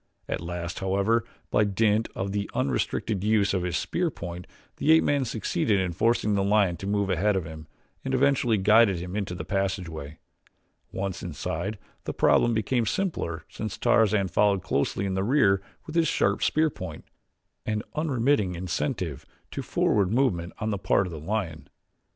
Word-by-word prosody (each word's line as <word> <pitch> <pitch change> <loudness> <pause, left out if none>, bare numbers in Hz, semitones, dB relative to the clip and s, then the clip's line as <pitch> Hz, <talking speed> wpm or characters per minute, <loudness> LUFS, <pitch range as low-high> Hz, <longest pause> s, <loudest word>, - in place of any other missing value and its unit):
At - - -3
last, 85 0 -5
however, 100 +4 +1 0.3
by 105 - +4
dint 105 +2 +1
of 95 +1 -2
the 100 0 -2
unrestricted 95 +7 -1
use 105 -2 +2
of 95 - +1
his 90 -1 -1
spear 175 -1 -1
point, 90 - -7 0.3
the 155 - +3
ape 160 - +5
man 140 -2 +1
succeeded 105 -2 0
in 95 -2 -1
forcing 110 +2 +2
the 100 -1 +2
lion 100 -3 +3
to 95 - -6
move 100 -1 0
ahead 100 +3 +2
of 95 -4 -1
him 80 0 -9 0.4
and 135 - -3
eventually 130 -4 +3
guided 105 0 +5
him 90 +2 -6
into 100 -4 -2
the 90 - -6
passageway. 85 -6 -3 0.7
Once 95 -1 -3
inside, 90 +5 -4 0.3
the - - -4
problem 120 -1 +4
became 115 +2 0
simpler 90 - -2
since 110 -2 -5
Tarzan 110 -5 +3
followed 100 0 +2
closely 70 +5 0
in 95 - -1
the 95 0 0
rear 100 -5 +3 0.2
with 155 - -8
his 165 -1 +3
sharp - - +1
spear 155 0 +2
point, 90 -9 -8 0.6
an 110 0 -1
unremitting 130 - +1
incentive 85 -4 -3 0.3
to - - -4
forward 100 -3 +1
movement 110 -9 +1
on 110 +1 -2
the 100 - -2
part 100 - +2
of 90 - -6
the 80 - -6
lion. 80 -5 -3
100 Hz, 170 wpm, -26 LUFS, 90-110 Hz, 0.7 s, ape